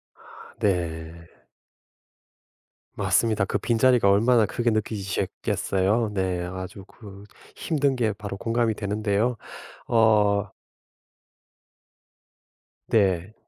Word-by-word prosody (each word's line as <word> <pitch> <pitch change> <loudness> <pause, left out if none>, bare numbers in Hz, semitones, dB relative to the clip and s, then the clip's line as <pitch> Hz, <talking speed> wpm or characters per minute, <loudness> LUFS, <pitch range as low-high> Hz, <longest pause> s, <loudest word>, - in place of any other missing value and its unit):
아 - - -16
네. 85 -3 -2 1.7
맞습니다 110 -3 +1
그 105 - -1
빈자리가 120 0 +3
얼마나 115 +3 +4
크게 120 +3 -1
느껴지셨겠어요. 105 0 -1
네. 95 -2 -1
아주 95 +1 -7
그 100 -3 -13 0.3
힘든 145 -4 0
게 110 -4 0
바로 100 -1 -7
공감이 115 0 0
되는데요. 105 +3 -1 0.5
어 105 -3 +3 2.3
네. 95 -3 +1
105 Hz, 185 characters per minute, -24 LUFS, 95-115 Hz, 2.3 s, 얼마나